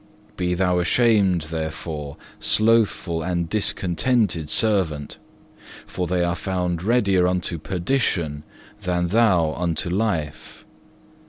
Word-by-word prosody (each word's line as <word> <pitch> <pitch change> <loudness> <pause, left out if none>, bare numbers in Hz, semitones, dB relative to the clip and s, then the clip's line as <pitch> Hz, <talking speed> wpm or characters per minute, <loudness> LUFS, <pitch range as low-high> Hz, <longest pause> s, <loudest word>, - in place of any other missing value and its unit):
Be 90 -1 -1
thou 90 -1 +1
ashamed 100 -3 +3
therefore, 80 -2 -5 0.2
slothful 110 -6 +2
and 85 0 -1
discontented 95 -2 0
servant, 90 -10 0 0.7
for 90 -1 -4
they 90 0 +1
are 85 0 0
found 90 -2 -2
readier 100 -4 +2
unto 90 -2 -1
perdition 85 - -1 0.4
than 90 -1 0
thou 90 -7 +3
unto 85 0 -2
life. 90 -7 -3
90 Hz, 100 wpm, -23 LUFS, 85-100 Hz, 0.7 s, ashamed